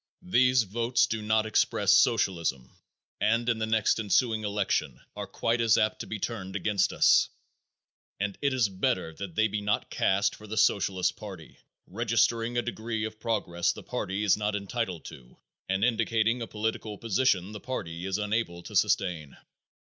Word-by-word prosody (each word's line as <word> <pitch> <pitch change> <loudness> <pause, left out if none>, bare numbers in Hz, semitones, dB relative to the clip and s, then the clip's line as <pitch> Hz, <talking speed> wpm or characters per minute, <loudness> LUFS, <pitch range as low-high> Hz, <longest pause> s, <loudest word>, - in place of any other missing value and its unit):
These 130 -8 +4
votes 115 +3 +1
do 115 -2 -3
not 110 +1 +1
express 110 - +2
socialism 75 -9 +2 0.5
and 115 +3 +1
in 115 -2 +1
the 110 - -1
next 110 0 +2
ensuing 110 +1 +1
election 105 -1 -1 0.2
are - - -5
quite 115 +1 0
as 115 -1 +4
apt 110 - +1
to - - -6
be 110 - -4
turned 95 -3 -5
against 105 -1 +1
us, - - +4 0.9
and 100 0 -2
it 140 - +2
is 130 -4 +2
better 95 -3 -1
that 90 0 -8
they 110 - +3
be 105 0 -3
not 105 0 -1
cast 100 +1 +1
for 110 - -12
the 110 +1 -5
Socialist 95 -3 +2
party, 95 -7 -10 0.3
registering 115 +2 0
a 120 - +1
degree 110 -1 -3
of 110 0 -7
progress 100 -7 0
the - - -10
party 95 +3 -3
is 105 - +4
not 105 0 -2
entitled 100 -3 -3
to - - -12 0.3
and 95 +1 0
indicating 115 0 +1
a 115 - -4
political 110 -1 -3
position 105 -4 +1
the 105 - -7
party 90 -9 -5
is 95 0 -1
unable 105 -5 -2
to - - -9
sustain. 80 -7 0
105 Hz, 170 wpm, -28 LUFS, 95-115 Hz, 0.9 s, These